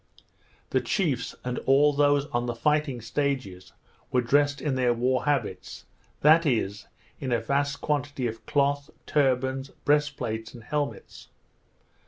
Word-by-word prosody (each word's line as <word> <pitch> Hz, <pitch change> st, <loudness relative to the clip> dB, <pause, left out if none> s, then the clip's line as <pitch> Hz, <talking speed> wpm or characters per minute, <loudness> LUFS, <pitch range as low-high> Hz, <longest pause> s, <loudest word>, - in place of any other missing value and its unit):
The -, -, +2 dB
chiefs, 150 Hz, -, -1 dB
and 125 Hz, 0 st, -3 dB
all 145 Hz, +2 st, +5 dB
those 145 Hz, 0 st, +3 dB
on 120 Hz, 0 st, -1 dB
the 120 Hz, -, -2 dB
fighting 150 Hz, -1 st, 0 dB
stages, 120 Hz, -7 st, -3 dB, 0.4 s
were 125 Hz, -, +3 dB
dressed 145 Hz, +3 st, +2 dB
in 150 Hz, -, -1 dB
their 125 Hz, -2 st, +2 dB
war 130 Hz, +2 st, 0 dB
habits; 135 Hz, -11 st, -2 dB, 0.4 s
that 160 Hz, +3 st, +6 dB
is, 105 Hz, -, -1 dB, 0.3 s
in 130 Hz, -3 st, -3 dB
a 120 Hz, -, +2 dB
vast 140 Hz, +4 st, -1 dB
quantity 145 Hz, -3 st, -1 dB
of 115 Hz, -1 st, -4 dB
cloth, 140 Hz, 0 st, +1 dB, 0.2 s
turbans, 130 Hz, -1 st, +1 dB, 0.2 s
breast 145 Hz, -1 st, +2 dB
plates, 110 Hz, +2 st, -4 dB
and 115 Hz, -, -11 dB
helmets. 145 Hz, +3 st, -4 dB
135 Hz, 140 wpm, -27 LUFS, 120-145 Hz, 0.4 s, that